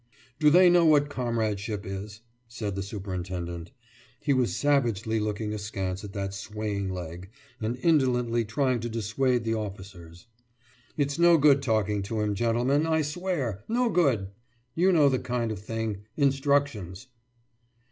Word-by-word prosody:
»Do 150 - +6
they 180 +4 +7
know 175 -1 +5
what 150 -2 +4
comradeship 110 -5 -2
is?« 100 +2 -7 0.3
said 115 -4 -4
the 100 - -2
superintendent. 90 -4 -5 0.5
He 145 - +1
was 130 -3 +1
savagely 115 -7 +1
looking 105 0 -2
askance 100 -2 -4
at 100 - -7
that 100 -1 -3
swaying 105 -1 -4
leg, 90 0 -6 0.3
and 115 +3 -2
indolently 125 -7 +2
trying 125 +3 0
to 120 +1 -4
dissuade 115 +3 0
the 115 0 -1
officers. 95 -5 -7 0.7
»It's 140 +1 -1
no 170 -1 +6
good 140 -2 +5
talking 105 -5 0
to 110 +3 -3
him, 105 -1 0
gentlemen, 120 +8 +1
I 160 -1 +2
swear! 150 - -3
No 240 +1 +1
good! 125 - +2 0.4
You 180 +6 +3
know 155 -5 +5
the 130 -2 +2
kind 120 -2 -2
of 105 - -5
thing 110 0 -3 0.2
instructions! 135 - 0
115 Hz, 145 wpm, -27 LUFS, 100-140 Hz, 0.7 s, they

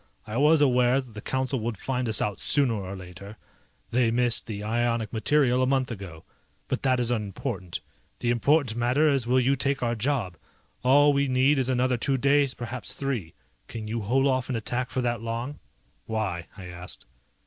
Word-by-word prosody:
I 105 - -6
was 150 +3 +5
aware 125 -1 +4
that 130 -4 -8
the 105 - -7
Council 130 +1 -1
would 115 -1 -3
find 125 +2 -2
us 110 - +1
out 105 -2 -3
sooner 140 -5 +2
or 100 -2 -4
later, 95 +3 -10 0.5
they 120 -1 +3
missed 120 0 +1
the 105 -2 -5
ionic 115 0 -1
material 125 +2 +2
a 130 - +2
month 130 -1 +1
ago. 95 -7 -8 0.4
But - - -2
that 130 -2 +2
is 120 0 0
unimportant. 100 -4 -3 0.4
The 120 - 0
important 130 0 +2
matter 125 +6 +2
is 135 -4 +1
will 130 +1 +4
you 130 +2 +3
take 135 0 0
our 120 -1 +1
job? 115 - -1 0.5
All 145 +3 +5
we 140 0 +2
need 130 +2 +3
is 130 -1 0
another 125 0 +1
two 135 +3 0
days, 140 0 +3
perhaps 120 -4 -5
three. 125 -12 -3 0.3
Can 110 -2 -6
you 115 +1 -2
hold 130 +6 +2
off 130 -2 +1
an 130 - -1
attack 120 +3 -2
for 130 - -2
that 120 -2 -1
long?" 115 +5 -4 0.5
"Why?" 95 -7 -2
I 95 - -9
asked. 90 0 -9
120 Hz, 190 wpm, -26 LUFS, 110-130 Hz, 0.5 s, was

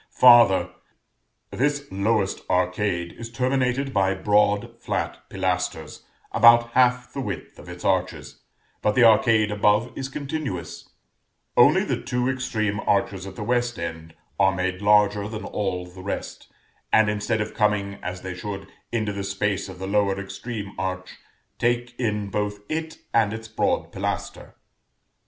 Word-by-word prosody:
Farther: 115 -8 +7 0.8
this 145 +2 0
lowest 100 +1 0
arcade 90 -1 0
is 115 0 -7
terminated 130 +2 0
by 95 -1 +2
broad 105 +1 +1
flat - - -3
pilasters, 90 -4 -2 0.3
about 120 +1 +6
half 125 0 +2
the 140 - -3
width 100 -8 -6
of - - -12
its 90 0 -9
arches; 90 -6 -1 0.4
but 105 - +1
the 125 - +5
arcade 110 -1 +5
above 105 +3 +2
is 135 0 -4
continuous; 140 - -5 0.7
only - - +6
the - - -2
two 125 0 -1
extreme 110 -6 -1
arches 100 -2 0
at 95 - -9
the - - -5
west 120 -1 0
end 80 -1 -6 0.2
are 95 -1 +4
made 95 +1 -2
larger 105 0 +3
than 110 0 -6
all 90 -3 -2
the 90 +1 -12
rest, 100 - -5 0.4
and 110 -1 +5
instead 105 +1 -1
of 105 +1 -3
coming, 100 -2 0
as 90 0 -5
they 95 -1 -4
should, 100 +1 -6 0.3
into 110 -3 -1
the 100 0 -4
space 100 0 -2
of 95 - -9
the 95 - -6
lower 100 -1 +1
extreme 100 +1 -6
arch, 95 0 -4 0.4
take 120 0 0
in 105 -4 -1
both 105 0 -2
it 160 0 -3 0.2
and 110 -3 +3
its 115 0 -7
broad 110 - -1
pilaster. - - -4
105 Hz, 145 wpm, -24 LUFS, 95-120 Hz, 0.8 s, Farther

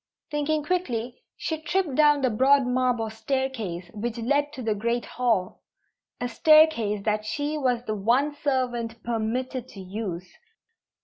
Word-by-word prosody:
Thinking 295 +1 0
quickly, 255 -9 -2 0.2
she 320 -1 -3
tripped 345 -2 0
down 295 0 +4
the 255 - +3
broad 265 +4 +4
marble 250 -3 0
staircase 220 -7 -3
which 225 +2 -4
led 285 +5 +1
to 255 - -7
the 220 -1 +1
great 235 +3 -1
hall 225 -7 -1 0.6
a 245 - -1
staircase 245 -7 +4
that 215 0 0
she 290 +7 -2
was 250 -5 0
the 215 - -2
one 240 +8 +2
servant 245 -6 -2
permitted 240 +2 -2
to 200 - -12
use. 185 -2 -5
245 Hz, 140 wpm, -26 LUFS, 220-285 Hz, 0.6 s, down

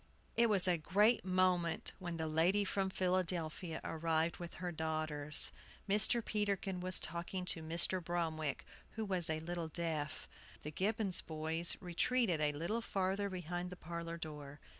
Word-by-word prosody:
It 235 0 +4
was 195 -3 +4
a 175 -2 +2
great 210 +8 +3
moment 185 -2 +1
when 175 -3 -4
the 160 - -2
lady 170 +6 +2
from 195 0 0
Philadelphia 180 -3 0
arrived 165 0 0
with 175 -1 -7
her 180 0 -4
daughters. 155 -2 +1 0.4
Mr. 210 +3 +2
Peterkin 200 -3 -1
was 185 0 +3
talking 170 +3 -4
to 170 -2 +1
Mr. 170 +3 +2
Bromwick, 160 -3 -2 0.3
who 220 0 -2
was 185 -5 +1
a 160 0 0
little 170 0 -3
deaf. 155 -3 -1 0.4
The 150 - -5
Gibbons 200 +2 +1
boys 160 +2 -1
retreated 180 0 +1
a 150 -1 +3
little 170 +10 -2
farther 195 -1 -1
behind 180 -1 -4
the 180 - -7
parlor 170 0 -5
door. 150 -3 -7
175 Hz, 150 wpm, -36 LUFS, 160-190 Hz, 0.4 s, It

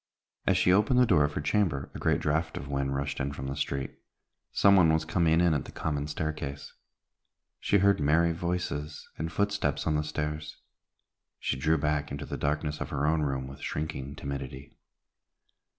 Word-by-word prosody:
As - - +4
she 90 - +4
opened 105 +6 +3
the 125 - +6
door 90 -9 +4
of 75 - -3
her - - -2
chamber, 75 -4 0
a - - -7
great - - +1
draught 80 +2 0
of 70 - -6
wind 70 -1 -1
rushed 70 0 -2
in 70 0 -2
from 65 -1 -6
the 70 0 -3
street. 70 -1 -3 0.5
Some 100 0 +5
one 85 -4 +6
was 80 0 +1
coming 85 -1 +2
in 85 -2 +4
at 75 - -1
the - - -9
common 75 -2 -2
staircase. 75 -2 -4 0.9
She 100 - +3
heard 100 -1 +4
merry 80 +3 +3
voices 85 -3 -3
and 80 +1 -2
footsteps 100 -6 0
on 80 - +1
the 75 - +1
stairs. 75 0 -4 0.8
She - - -1
drew 80 +5 +2
back 75 0 -1
into 70 +1 -4
the - - -5
darkness 75 +1 -1
of - - -3
her 70 +1 -1
own 80 +1 +2
room 70 -3 -1
with 70 +1 -10
shrinking 70 -2 -4
timidity. 70 -1 -6
75 Hz, 185 wpm, -29 LUFS, 70-80 Hz, 0.9 s, the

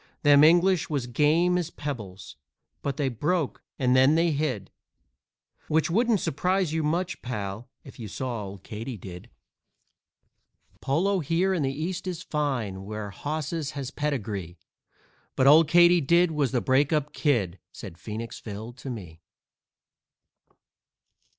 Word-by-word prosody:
Them 145 -1 +7
English 175 +2 +4
was 140 -5 -1
game 160 +8 +2
as 170 -2 -3
pebbles, 105 - -7 0.5
but 140 -2 -3
they 145 -3 0
broke 150 +5 -1 0.2
and 125 -1 +2
then 130 +4 +5
they 165 0 +3
hid, 140 -10 -2 1.0
Which 160 +2 +1
wouldn't 225 +1 +2
surprise 180 +2 0
you 160 - 0
much, 170 +4 -1
pal, 105 -1 -5
if 135 - -14
you 110 - -6
saw 120 +1 -4
Old 95 -1 -10
Katydid. 105 -6 -8 1.5
_"Polo 180 +8 +1
here 170 +5 +1
in 175 - 0
the 135 -1 0
East 170 +6 -4
is 180 -3 -4
fine, 125 -11 -2
where 105 0 -6
hosses 155 - -4
has 135 -1 -4
pedigree, 105 - -3 0.8
But 130 - +2
Old 150 +3 +7
Katydid 175 0 +5
was 145 -5 0
the 125 -2 +1
break 135 +3 +2
up 150 -2 0
Kid," 105 - 0
said 85 -5 -10
Phoenix 115 +1 -6
Phil 110 +2 -7
to 130 +2 -9
me. 90 -9 -8
140 Hz, 135 wpm, -26 LUFS, 115-165 Hz, 1.5 s, Them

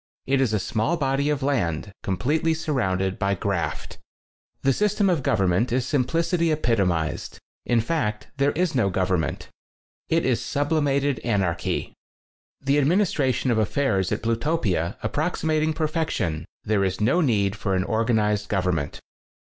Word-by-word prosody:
It 135 0 +2
is 130 -5 +2
a 110 - +2
small 110 - 0
body 140 0 0
of 145 -2 -1
land 100 - -1
com 95 -2 -2
pletely 160 - +1
surrounded 95 - -1
by 100 -1 +1
graft. 90 -2 -3 0.6
The 135 - +4
system 210 - +2
of 165 -6 +1
government 100 0 +1
is 125 0 +1
sim 135 -2 +1
plicity 165 +3 +1
epitomized 100 - 0 0.2
— - - -67
in 120 -1 +3
fact, 110 -7 -2
there 140 +1 +3
is 175 0 0
no 120 -7 +2
government. 90 -3 -1 0.6
It 165 0 +2
is 125 -3 +1
sublimated 145 -2 0
anarchy. 95 - -1 0.7
The 140 +2 +2
administration 145 -5 +2
of 110 - +2
affairs 105 -4 +1
at - - -2
Plu 115 0 +2
topia 110 - -1
approximating 155 +4 0
perfection, 155 - -1 0.2
there 105 -2 +1
is 95 -1 -1
no 130 +12 +3
need 105 - +1
for 100 -3 -1
an 95 - +1
organized 110 -1 +1
govern 90 -3 +1
ment. 70 -2 -5
120 Hz, 150 wpm, -24 LUFS, 100-150 Hz, 0.7 s, The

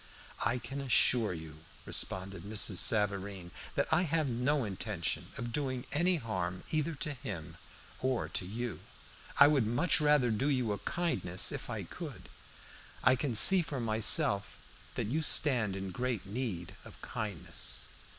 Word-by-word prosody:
"I 125 - +1
can 140 +3 -6
assure 125 -4 +4
you," 80 -3 -8 0.3
responded 95 -1 -3
Mrs. 100 -1 -2
Savareen, 100 -3 0 0.2
"that - - +1
I 165 - +4
have 165 -3 0
no 125 +4 0
intention 100 -4 -3
of 120 0 -5
doing 130 -3 -2
any 175 +4 +2
harm 95 - -3
either 155 +1 -1
to 145 +1 -4
him 100 - -7 0.4
or 130 -2 -1
to - - -4
you. 115 +5 -5 0.6
I 145 - +10
would 140 -6 +3
much 145 +9 +2
rather 150 -5 +4
do 130 +7 0
you 125 -6 0
a 100 - -3
kindness, 165 - -1
if - - -6
I - - -4
could. - - -9 0.7
I 130 0 +5
can 130 -2 -2
see 190 - +9
for 145 -5 -4
myself 110 -3 +2 0.4
that - - -1
you 145 +10 -1
stand 125 -10 +2
in 95 -1 -5
great 125 +1 -3
need 95 -5 -4
of - - -14
kindness." 105 -8 -5
120 Hz, 150 wpm, -32 LUFS, 100-140 Hz, 0.7 s, I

